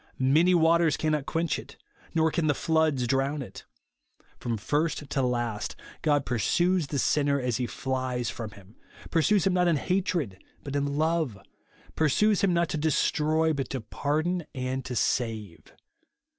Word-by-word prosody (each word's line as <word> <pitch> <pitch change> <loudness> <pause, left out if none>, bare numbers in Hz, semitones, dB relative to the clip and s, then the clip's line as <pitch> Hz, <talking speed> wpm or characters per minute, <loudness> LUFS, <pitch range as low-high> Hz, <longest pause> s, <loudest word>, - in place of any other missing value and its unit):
Many 155 +8 +4
waters 165 -1 +4
cannot 155 -2 -1
quench 165 0 0
it, - - -12 0.4
nor 160 0 +3
can 165 -2 0
the 145 - +2
floods 160 -5 +1
drown 135 +3 0
it. - - -11 0.7
From 115 -2 -2
first 150 +6 -1
to 135 - +1
last, 120 -4 -2 0.3
God 145 -3 +2
pursues 170 - +1
the 140 - -3
sinner 140 +2 +2
as 125 -3 -1
he 125 -1 -1
flies 130 -2 -2
from 115 -1 -5
him; 100 +2 -17 0.3
pursues 170 +4 +3
him 190 - +3
not 180 -1 +3
in 170 - +3
hatred, 165 - -1 0.2
but 140 0 -5
in 140 0 -1
love; 160 -7 0 0.6
pursues 195 +7 +3
him 195 - +3
not 170 -1 +1
to - - -2
destroy, 155 +1 +2
but 140 -2 -3
to 135 - -3
pa 115 +5 -6
rdon 170 +4 +1
and 130 0 -2
to 125 - -4
save. 110 -7 -2
145 Hz, 160 wpm, -27 LUFS, 125-160 Hz, 0.7 s, Many